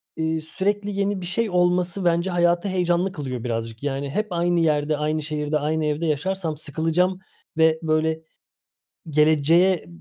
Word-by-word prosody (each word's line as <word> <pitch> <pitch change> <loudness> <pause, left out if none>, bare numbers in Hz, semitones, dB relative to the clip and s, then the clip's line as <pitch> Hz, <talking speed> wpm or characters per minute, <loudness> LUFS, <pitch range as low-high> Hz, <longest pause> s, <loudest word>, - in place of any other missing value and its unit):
eee, 160 0 -1
sürekli 205 +5 -2
yeni 200 -1 0
bir - - -5
şey 210 +5 -1
olması 180 +1 +1
bence 170 +2 +2
hayatı 175 +2 +2
heyecanlı 180 0 +1
kılıyor 130 - -5
birazcık. 115 0 -4
Yani 140 0 -2
hep 210 +10 -1
aynı 175 0 +1
yerde, 150 -2 +1
aynı 155 +1 -1
şehirde, 150 0 -2
aynı 155 +1 -1
evde 150 +2 -1
yaşarsam 160 +1 -1
sıkılacağım 165 +5 0 0.4
ve 160 0 +4
böyle 160 0 0 0.9
geleceğe 155 - +3
160 Hz, 145 wpm, -23 LUFS, 150-180 Hz, 0.9 s, ve